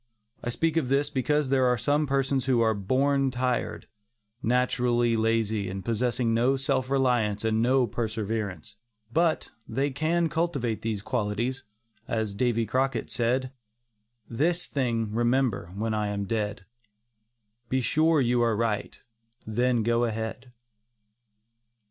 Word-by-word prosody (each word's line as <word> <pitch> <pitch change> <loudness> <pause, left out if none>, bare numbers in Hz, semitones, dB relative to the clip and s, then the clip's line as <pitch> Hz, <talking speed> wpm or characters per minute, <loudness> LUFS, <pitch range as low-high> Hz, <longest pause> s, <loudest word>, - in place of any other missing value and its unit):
I - - -2
speak 165 +6 0
of 140 -6 +1
this 140 +2 +1
because 150 +1 +1
there 130 -1 +3
are 125 0 +2
some 145 +6 +1
persons 135 -1 0
who 130 -3 +2
are 110 -1 +3
"born 135 +7 +1
tired"; 125 0 -2 0.6
naturally 120 -1 +2
lazy 110 -3 0
and 95 0 -6
possessing 120 0 0
no 125 +4 +3
self 130 -1 -1
reliance 120 -6 +1
and 110 0 +2
no 130 +2 +3
perseverance. 110 -2 -4 0.4
But, 165 +1 +1 0.2
they 135 +5 -1
can 160 +4 +1
cultivate 140 - -1
these 110 -3 -3
qualities, 120 +4 -1 0.5
as 110 -3 -1
Davy 115 +1 +1
Crockett 130 +2 -1
said: 125 +2 0 0.8
"This 165 +9 0
thing 115 -6 -1
remember, 120 -5 +1
when 110 +2 -1
I 105 -1 0
am 100 -1 -2
dead, 105 -1 -2 1.0
Be 130 - +1
sure 155 +5 +3
you 120 -2 +2
are 115 -3 +2
right, 110 -2 -2 0.5
then 120 +1 +1
go 120 +1 +2
ahead." 115 +2 -4
120 Hz, 130 wpm, -27 LUFS, 110-135 Hz, 1.0 s, there